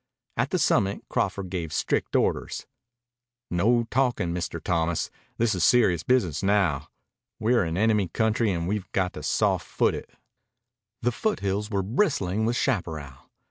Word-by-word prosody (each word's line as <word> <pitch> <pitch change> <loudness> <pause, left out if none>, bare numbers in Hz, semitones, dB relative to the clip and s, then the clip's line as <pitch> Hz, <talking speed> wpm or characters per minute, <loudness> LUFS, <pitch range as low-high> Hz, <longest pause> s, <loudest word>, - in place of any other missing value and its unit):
At - - 0
the - - +1
summit 100 0 +2
Crawford 95 -3 -1
gave 85 -4 -3
strict - - -1
orders. - - 0 0.9
"No 115 +7 +3
talkin', 120 -9 +1
Mr. 85 -1 -3
Thomas. 80 0 0 0.3
This 115 -1 +2
is 90 -3 0
serious 100 -9 +4
business 90 - +1
now. 95 -8 +1 0.5
We're 115 0 +3
in 80 0 -2
enemy 105 -2 +3
country 110 +5 +1
and 85 +2 -1
have 100 -3 -4
got 90 -1 0
to - - -7
soft - - +1
foot - - +1
it." - - -6 0.9
The 120 - +2
foothills 105 - -1
were 100 -3 0
bristling 110 - +1
with 120 - 0
chaparral. 80 - -2
100 Hz, 145 wpm, -26 LUFS, 85-115 Hz, 0.9 s, serious